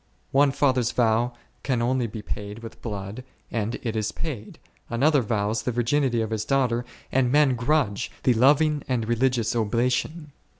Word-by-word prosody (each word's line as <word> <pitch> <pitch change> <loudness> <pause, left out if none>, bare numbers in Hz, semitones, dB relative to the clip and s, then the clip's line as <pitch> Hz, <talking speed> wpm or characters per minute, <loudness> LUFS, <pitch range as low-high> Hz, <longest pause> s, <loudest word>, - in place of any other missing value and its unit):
One 140 +1 +5
father's 130 -4 +2
vow 120 +1 +2 0.3
can 130 -3 0
only 125 0 +1
be 105 0 -7
paid 105 +2 -6
with 115 - -10
blood, 105 +2 -5 0.3
and 115 0 -1
it 115 -2 -2
is 110 -1 -1
paid; 130 -10 -6 0.3
another 140 +4 +3
vow$ 105 -2 -1
the 115 +2 -1
virginity 120 +1 +1
of 110 0 -3
his 110 -1 -1
daughter, 125 -2 +1 0.3
and 125 -2 +2
men 145 -2 +4
grudge 120 -3 0
the 125 - +4
loving 145 +5 +4
and 120 -4 -1
re 120 - +1
ligious 120 -2 +1
oblation. 125 +8 0
120 Hz, 165 wpm, -25 LUFS, 110-135 Hz, 0.3 s, One